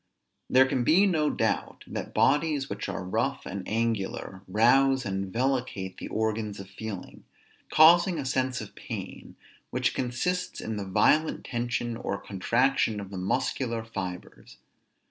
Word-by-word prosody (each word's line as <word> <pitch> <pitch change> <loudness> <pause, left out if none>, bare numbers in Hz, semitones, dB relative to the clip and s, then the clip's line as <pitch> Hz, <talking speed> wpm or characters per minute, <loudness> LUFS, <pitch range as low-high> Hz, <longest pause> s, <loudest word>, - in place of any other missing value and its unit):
There 130 +1 +6
can 130 -2 0
be 175 +10 +5
no 155 -6 +2
doubt - - -1
that - - -5
bodies 145 0 +2
which 100 +1 -4
are - - -4
rough 115 +9 -1
and 100 +1 -4
angular, 110 -4 -2
rouse 130 +6 +4
and 95 -1 -3
vellicate 120 -6 -1
the - - -5
organs 110 -2 -2
of 95 0 -10
feeling, 100 -2 -7 0.5
causing 170 +3 +6
a 140 - -3
sense 130 -1 0
of 110 - -9
pain, - - -8 0.3
which - - 0
consists 130 +9 -2
in 110 -1 -4
the 100 - -4
violent 155 +11 +2
tension 120 -1 -2
or 100 - -3
contraction 115 +3 +1
of 100 -1 -8
the 95 - -6
muscular 115 +4 -1
fibres. 95 -5 -7
115 Hz, 145 wpm, -28 LUFS, 100-135 Hz, 0.5 s, There